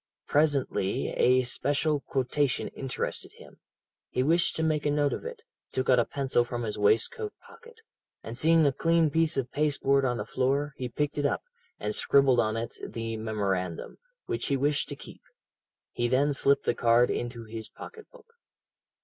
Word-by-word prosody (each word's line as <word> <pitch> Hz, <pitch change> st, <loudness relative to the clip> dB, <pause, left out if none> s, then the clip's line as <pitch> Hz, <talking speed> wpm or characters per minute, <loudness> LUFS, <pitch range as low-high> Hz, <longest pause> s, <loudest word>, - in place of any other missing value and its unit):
Presently 140 Hz, -9 st, +1 dB
a 130 Hz, +1 st, +3 dB
special 145 Hz, +4 st, 0 dB
quotation 135 Hz, +1 st, -1 dB
interested 135 Hz, -2 st, -4 dB
him; -, -, -16 dB, 0.5 s
he 125 Hz, -, 0 dB
wished 170 Hz, +4 st, +2 dB
to 160 Hz, -, -1 dB
make 155 Hz, -2 st, +1 dB
a 150 Hz, -, +1 dB
note 145 Hz, -1 st, +1 dB
of -, -, -5 dB
it, 475 Hz, -2 st, -7 dB, 0.3 s
took 130 Hz, 0 st, +1 dB
out 125 Hz, -, +5 dB
a 120 Hz, -, +3 dB
pencil 135 Hz, -3 st, 0 dB
from 120 Hz, 0 st, -4 dB
his 105 Hz, -2 st, -3 dB
waistcoat 115 Hz, -, +1 dB
pocket, 470 Hz, 0 st, -16 dB, 0.5 s
and 115 Hz, -, -7 dB
seeing 160 Hz, +4 st, +4 dB
a 140 Hz, -, +4 dB
clean 165 Hz, +2 st, +2 dB
piece 165 Hz, -1 st, +1 dB
of 130 Hz, -2 st, -2 dB
paste 150 Hz, 0 st, -1 dB
board 140 Hz, 0 st, +3 dB
on 125 Hz, -2 st, 0 dB
the -, -, -4 dB
floor, 140 Hz, +3 st, 0 dB
he 125 Hz, -1 st, -4 dB
picked 150 Hz, +4 st, -2 dB
it 145 Hz, -, 0 dB
up, -, -, -2 dB, 0.4 s
and -, -, -2 dB
scribbled 135 Hz, -3 st, +4 dB
on 110 Hz, -1 st, +1 dB
it 115 Hz, +1 st, -5 dB
the 115 Hz, -1 st, -4 dB
memorandum, 100 Hz, -6 st, -3 dB, 0.3 s
which -, -, -3 dB
he 140 Hz, -, +1 dB
wished 145 Hz, +2 st, 0 dB
to -, -, -5 dB
keep. -, -, -12 dB, 0.7 s
He 120 Hz, -, -1 dB
then 140 Hz, +4 st, +2 dB
slipped 140 Hz, 0 st, +2 dB
the -, -, +2 dB
card 120 Hz, +1 st, +3 dB
into 120 Hz, -1 st, -4 dB
his 110 Hz, 0 st, -7 dB
pocket 445 Hz, -2 st, -11 dB
book. -, -, -17 dB
135 Hz, 180 wpm, -28 LUFS, 120-150 Hz, 0.7 s, out